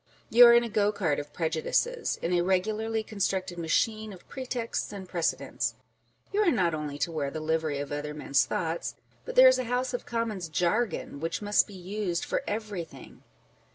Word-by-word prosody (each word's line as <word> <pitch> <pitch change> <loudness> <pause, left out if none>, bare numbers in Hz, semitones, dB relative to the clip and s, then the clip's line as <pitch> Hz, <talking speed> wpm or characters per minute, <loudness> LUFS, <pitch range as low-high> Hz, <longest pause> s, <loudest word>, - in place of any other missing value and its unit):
You 240 +1 +10
are 235 - +8
in 240 - +5
a - - -2
go 210 -2 +2
cart 170 -9 0
of 145 0 -7
prejudices, 170 - 0
in 170 - 0
a 175 - +3
regularly 215 +5 0
constructed 190 -4 -2
machine 215 +6 0
of 185 -3 -13
pretexts 250 -5 -3
and 195 -2 -8
precedents; 170 -2 -1 0.6
you 410 - +1
are 405 - +4
not 180 - +2
only 150 -2 -4
to 165 - -1
wear 150 -4 -2
the 155 - -5
livery 155 -1 -1
of 140 0 -5
other 150 +1 -4
men's 140 -3 +2
thoughts, 165 +5 -3 0.3
but - - -6
there 260 +1 +9
is 255 0 +5
a 255 - -2
House 250 +2 -1
of 245 - -4
Commons 220 -7 -2
jargon 180 0 -1
which 165 +6 -3
must 205 0 +3
be 205 - -11
used 185 -1 -3
for - - -1
every 210 -4 -3
thing. - - -14
190 Hz, 190 wpm, -28 LUFS, 160-225 Hz, 0.6 s, You